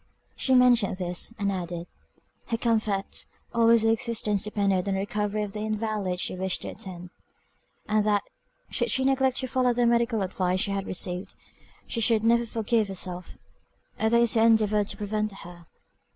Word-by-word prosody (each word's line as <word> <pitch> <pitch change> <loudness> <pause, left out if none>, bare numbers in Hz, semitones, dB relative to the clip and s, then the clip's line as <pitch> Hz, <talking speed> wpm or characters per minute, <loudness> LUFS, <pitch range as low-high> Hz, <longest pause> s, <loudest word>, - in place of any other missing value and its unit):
She 260 - +2
mentioned 245 -6 +4
this, 180 +2 -1
and 200 -2 0
added, 175 -2 -4 0.6
"Her 230 - -1
comfort, 220 -4 0 0.3
almost 230 -1 +4
her 225 - +4
existence, 225 -4 0
depended 200 -3 0
on 195 - 0
the - - -1
recovery 210 +1 -2
of 200 -1 -6
the 210 - -4
invalid 215 -4 -2
she - - -2
wished 190 0 -2
to - - -5
attend; 180 -2 -8 0.8
and 215 0 +2
that 205 -1 +2 0.5
should - - 0
she 265 - +1
neglect 265 -1 +2
to 260 - 0
follow 250 -1 +1
the 240 0 +2
medical 235 -2 +2
advice 185 0 -1
she 200 - -1
had 195 -1 -3
received, 180 0 -1 0.5
she 230 - -3
should 220 -1 +3
never 235 +1 +3
forgive 225 -1 0
herself, 180 -2 -4 0.6
or 220 - +3
those 235 0 +4
who 230 - +2
endeavoured 215 -2 +3
to - - -5
prevent 215 0 -2
her." 175 -3 -12
210 Hz, 170 wpm, -26 LUFS, 195-230 Hz, 0.8 s, mentioned